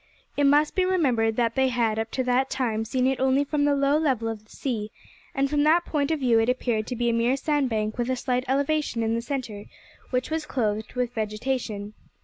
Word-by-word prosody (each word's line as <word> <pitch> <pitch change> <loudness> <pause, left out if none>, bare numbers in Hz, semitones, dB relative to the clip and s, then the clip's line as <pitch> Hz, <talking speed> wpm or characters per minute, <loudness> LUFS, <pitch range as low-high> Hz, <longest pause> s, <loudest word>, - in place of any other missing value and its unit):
It 285 - +2
must 295 +2 +4
be 370 - +2
remembered 255 -12 +1
that 235 -1 +1
they 265 +1 +2
had, 230 -3 0
up 225 0 -2
to 260 - 0
that 255 +2 +1
time, 225 -4 -1
seen 255 +3 0
it 265 0 +1
only 265 +2 +3
from 290 0 0
the 290 -1 +3
low 280 +2 +2
level 255 -8 0
of 220 -2 -6
the 215 - -29
sea, 220 -6 -3 0.5
and 275 0 +2
from 290 +1 +1
that 320 +4 +4
point 285 -2 -1
of 320 -2 0
view 240 -3 +4
it 225 +2 +2
appeared 235 -3 0
to 250 - -3
be 240 0 -1
a 235 - +2
mere 235 +3 +2
sandbank 250 -7 -1
with 240 +1 0
a 260 - +1
slight 250 0 -1
elevation 280 -2 0
in 225 0 0
the 230 - -1
centre, 235 -5 -5 0.4
which 255 +3 -2
was 315 -1 -2
clothed 220 -3 -2
with 250 -1 -1
vegetation. 215 -1 -3
250 Hz, 225 wpm, -25 LUFS, 225-280 Hz, 0.5 s, must